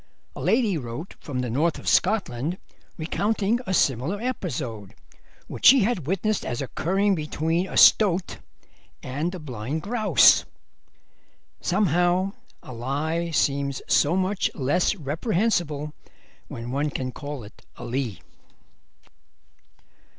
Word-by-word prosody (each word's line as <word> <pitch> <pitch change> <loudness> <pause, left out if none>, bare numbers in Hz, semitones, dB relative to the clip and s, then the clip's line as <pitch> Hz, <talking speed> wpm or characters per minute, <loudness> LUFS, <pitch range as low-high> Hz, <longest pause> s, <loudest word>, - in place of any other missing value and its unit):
A - - -7
lady 220 -8 +2
wrote 125 +7 -7
from 130 -4 -4
the 125 - -3
North 155 +7 +1
of - - -10
Scotland 175 - +1 0.4
recounting 205 +6 0
a 190 - -1
similar 140 - +1
episode 130 - -4 0.5
which - - +1
she 265 0 +8
had 195 - -1
witnessed 195 +4 0
as 120 - -3
occurring 190 +9 0
between 160 +2 -1
a - - -5
stoat 190 -4 +5 0.7
and 150 +8 -3
a - - -5
blind 140 0 -5
grouse. 210 - +5 1.2
Somehow 180 0 +1 0.3
a 130 - -9
lie 150 +8 -2
seems 140 -3 0
so 150 +5 +3
much 190 +1 0
less 160 +9 +1
reprehensible 160 - -1 0.5
when 120 +1 -7
one 145 +3 0
can 130 -2 -4
call 145 -2 -7
it 105 - -15
a 120 - -9
lee. 120 -5 -3
160 Hz, 120 wpm, -25 LUFS, 135-190 Hz, 1.2 s, she